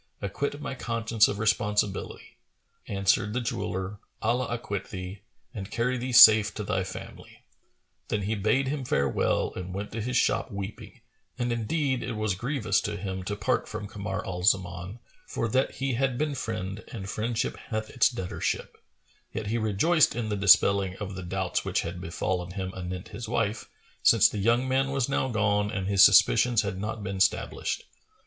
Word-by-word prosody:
Acquit 140 +9 -3
my 150 - -4
conscience 115 -3 +1
of 100 - -3
responsibility.[FN#435]" 105 -2 -3
Answered 100 +1 +2
the 125 - 0
jeweller, 105 -5 -3 0.2
"Allah 120 +3 0
acquit 105 -4 -4
thee! 95 +1 -7 0.3
and 100 -4 -6
carry 125 +3 0
thee 125 +1 -3
safe 110 -3 +9
to 105 - -4
thy 95 -1 -1
family!" 95 0 -10 0.6
Then 105 -2 -1
he 105 +3 -1
bade 110 +6 +1
him 140 0 -2
farewell 70 - 0
and 90 0 -6
went 100 +1 -5
to 115 - -4
his 125 +3 -1
shop - - +1
weeping, 100 +1 -7 0.4
and 120 -1 -1
indeed 130 +3 -1
it 120 - -4
was 110 -2 -1
grievous 110 -1 0
to 105 0 -3
him 95 -1 -4
to 105 - -2
part - - 0
from - - -5
Kamar 100 -2 -5
al 90 -1 -4
Zaman, 90 0 0 0.3
for 115 - -2
that 130 +4 +1
he 135 -1 -1
had 130 0 0
been 150 +1 -1
friend 110 -5 -4
and 100 -5 -6
friendship 115 +2 -2
hath 110 -1 -3
its 125 - +4
debtorship; 95 -8 -3 0.5
yet 110 0 -4
he 120 - +1
rejoiced 115 - +3
in 115 -2 -2
the 105 - -1
dispelling 100 -1 +4
of 100 -2 -5
the 95 - -6
doubts 95 0 -2
which - - 0
had 85 +1 -6
befallen 90 0 -3
him 95 -1 -4
anent 90 +1 -6
his 110 +1 -7
wife, 110 -2 -1 0.3
since - - +6
the 105 - -4
young 120 +5 +2
man 135 +1 +1
was 135 -2 0
now 135 -1 0
gone 105 -2 +1
and 100 -4 -3
his 100 0 +5
suspicions 115 +3 +6
had 100 -2 -4
not 105 +1 -4
been 95 -1 -4
stablished. 95 0 0
105 Hz, 175 wpm, -27 LUFS, 95-120 Hz, 0.6 s, safe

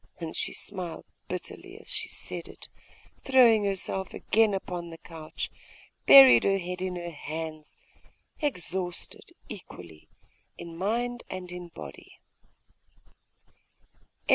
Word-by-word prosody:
And 165 -2 -5
she - - -2
smiled 180 -5 -5 0.2
bitterly - - -6
as - - -17
she - - -3
said - - -5
it, - - -12 0.4
and - - -32
throwing 235 -6 +6
herself 190 -1 -2
again 220 -2 +3
upon 175 -2 -4
the 165 - -9
couch, 160 -2 -7 0.6
buried 130 -3 +11
her 195 0 +3
head 180 0 -5
in 185 -1 -2
her 175 -1 -5
hands, 155 0 -6 0.6
exhausted 180 - -3 0.2
equally 80 -3 -11 0.5
in 170 - -8
body 235 +7 -1
and 180 -1 -6
in 180 -1 -7
mind. 70 - -9
180 Hz, 115 wpm, -28 LUFS, 160-195 Hz, 0.6 s, buried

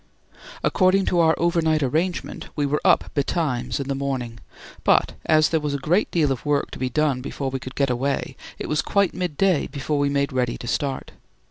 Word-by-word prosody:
According 190 +1 +3
to 175 - +1
our 160 -1 +4
over 170 0 +2
night 155 -2 +2
arrangement, 165 +7 -2
we 145 - 0
were 145 +2 0
up - - +3
betimes 135 -5 -1
in 140 - -4
the 140 - 0
morning, 130 -4 -3 0.4
but - - +3
as 155 0 +4
there 160 - +1
was 150 -1 -2
a - - 0
great 165 +9 +1
deal 155 -5 +1
of 130 - -3
work 145 -1 0
to - - -8
be 130 - -1
done 145 -1 +1
before 135 0 -4
we 135 - -3
could 130 +1 -9
get 140 -2 +1
away, 135 +3 -2 0.2
it - - -5
was 150 - +1
quite 200 -2 +1
midday 180 0 +1
before 145 +1 -2
we 145 0 +2
made 140 -1 0
ready 125 -2 0
to - - -9
start. 135 +2 -2
145 Hz, 210 wpm, -23 LUFS, 135-160 Hz, 0.4 s, our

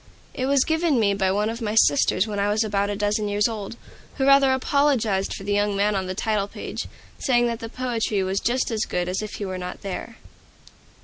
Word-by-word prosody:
It 255 - -2
was 275 -1 +4
given 320 -4 +1
me 200 -2 +3
by 190 -1 +1
one 205 +2 +1
of 230 +2 -4
my 215 -1 -2
sisters 185 +1 +4
when 210 -2 -4
I 200 +1 +1
was 215 +2 +2
about 200 -1 0
a 205 - -2
dozen 210 +1 0
years 205 +1 +2
old, 220 -2 -6 0.4
who 265 - 0
rather 275 -1 +6
apologized 260 -7 +1
for - - -8
the 205 +1 -1
young 205 0 +1
man 205 +1 +2
on 190 -2 -2
the 185 - -4
title 210 -1 0
page, - - -6 0.3
saying 240 -3 +2
that 235 -1 -2
the 225 - -6
poetry 230 -5 -1
was 190 +1 -1
just 250 +1 0
as 220 -2 0
good 175 0 -2
as 185 +3 -2
if 215 -1 -6
he 205 - -4
were 185 -1 -4
not 180 0 -6
there. 200 +4 -6
210 Hz, 230 wpm, -24 LUFS, 200-240 Hz, 0.4 s, rather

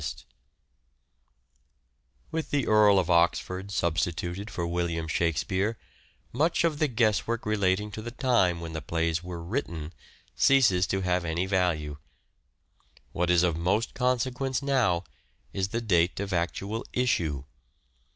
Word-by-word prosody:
Dates - - -4
of - - -18 2.0
With 160 0 -3
the 140 -4 0
Earl 105 -2 +5
of 90 -2 +1
Oxford 90 +3 +1
substituted 85 +2 -2
for 90 -4 -3
William 85 -1 -2
Shakspere 85 - 0 0.6
much 160 +8 +2
of 160 -3 +1
the 155 - +3
guesswork 115 -1 0
relating 105 -1 +1
to 110 - -6
the 120 - -5
time 120 -9 +1
when 80 -1 -6
the 80 - -4
plays 85 0 -1
were 90 -2 -6
written 85 - -4 0.4
ceases 100 -10 +4
to 95 - -1
have 90 -1 0
any 85 +2 -1
value: 85 -6 0 1.1
what 90 +1 -1
is 90 -1 +4
of 85 -3 +2
most 95 +7 0
consequence 130 +1 0
now 120 -11 +2 0.5
is 95 -1 -1
the 115 +4 -3
date 90 -6 +2
of 100 -1 -3
actual 100 +6 -2
issue. 80 - 0
95 Hz, 135 wpm, -27 LUFS, 85-115 Hz, 2.0 s, Earl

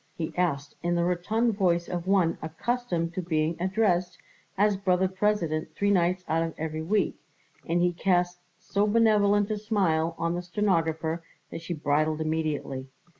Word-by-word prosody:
he 160 -2 -3
asked 145 -6 -1
in 175 0 0
the 170 - +2
rotund 215 +7 +1
voice 175 -4 +1
of 175 0 -4
one 190 -4 +3
accustomed 170 0 -2
to 185 - -2
being 160 -1 0
addressed 185 -2 +1 0.4
as 205 +1 +3
Brother 190 -1 +2
President 180 -6 -1
three 200 +3 +1
nights 180 -1 +1
out 160 +1 +1
of 165 -1 -3
every 155 0 -3
week, 195 +2 0 0.5
and 175 +1 +2
he 180 0 +2
cast 175 0 +1 0.2
so 200 +3 0
benevolent 205 -2 +3
a 210 - -1
smile 170 -7 +1
on 170 +1 -1
the 175 - -2
stenographer 165 -4 0 0.3
that - - -6
she 170 +1 -4
bridled 155 +1 +1
immediately. 155 -4 -2
175 Hz, 160 wpm, -27 LUFS, 160-200 Hz, 0.5 s, one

